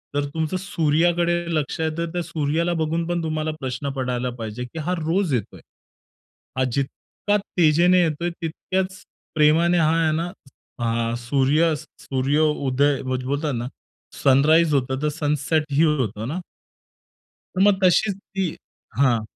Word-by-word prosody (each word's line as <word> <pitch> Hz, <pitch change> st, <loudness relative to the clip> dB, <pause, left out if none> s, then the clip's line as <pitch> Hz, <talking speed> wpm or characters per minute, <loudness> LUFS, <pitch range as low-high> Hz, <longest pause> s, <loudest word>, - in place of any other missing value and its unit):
तर 145 Hz, 0 st, +1 dB
तुमचं 160 Hz, +3 st, -1 dB
सूर्याकडे 170 Hz, -1 st, +1 dB, 0.2 s
लक्ष 150 Hz, 0 st, -2 dB
आहे 160 Hz, -, +1 dB
तर 170 Hz, -, 0 dB
त्या 175 Hz, -, -1 dB
सूर्याला 165 Hz, +2 st, -1 dB
बघून 165 Hz, +2 st, -1 dB
पण 175 Hz, -1 st, -1 dB
तुम्हाला 155 Hz, 0 st, -1 dB
प्रश्न 130 Hz, +1 st, -3 dB
पडायला 125 Hz, -1 st, -1 dB
पाहिजे, 110 Hz, +2 st, -5 dB
की 160 Hz, +6 st, -8 dB
हा 170 Hz, +4 st, -1 dB
रोज 165 Hz, 0 st, 0 dB
येतोय. 115 Hz, -6 st, -3 dB, 1.0 s
हा 130 Hz, -, +2 dB
जितका 170 Hz, +8 st, -2 dB, 0.2 s
तेजीने 175 Hz, +3 st, +5 dB
येतोय 165 Hz, +1 st, -1 dB
तितक्याच 185 Hz, +3 st, -4 dB, 0.3 s
प्रेमाने 160 Hz, +3 st, +4 dB
हा 160 Hz, 0 st, +3 dB
आहे 155 Hz, -, +2 dB
ना 170 Hz, +2 st, -2 dB, 0.5 s
हा 115 Hz, 0 st, 0 dB
सूर्य 140 Hz, +6 st, +2 dB
सूर्य 140 Hz, -1 st, -2 dB
उदय 145 Hz, -2 st, +2 dB
बोलतात 135 Hz, +3 st, -2 dB
ना 120 Hz, +1 st, -3 dB, 0.6 s
सनराईज 150 Hz, +4 st, +5 dB
होतं 130 Hz, 0 st, 0 dB
तर 150 Hz, -, +1 dB
सनसेटही 150 Hz, +1 st, +1 dB
होतं 115 Hz, -, 0 dB
ना? 165 Hz, +7 st, -3 dB, 1.1 s
तर 185 Hz, -, +1 dB
मग 200 Hz, -1 st, +4 dB
तशीच 195 Hz, +3 st, +4 dB
ती 195 Hz, -2 st, -3 dB, 0.5 s
हां. 125 Hz, -5 st, +3 dB
155 Hz, 135 wpm, -23 LUFS, 135-170 Hz, 1.1 s, तेजीने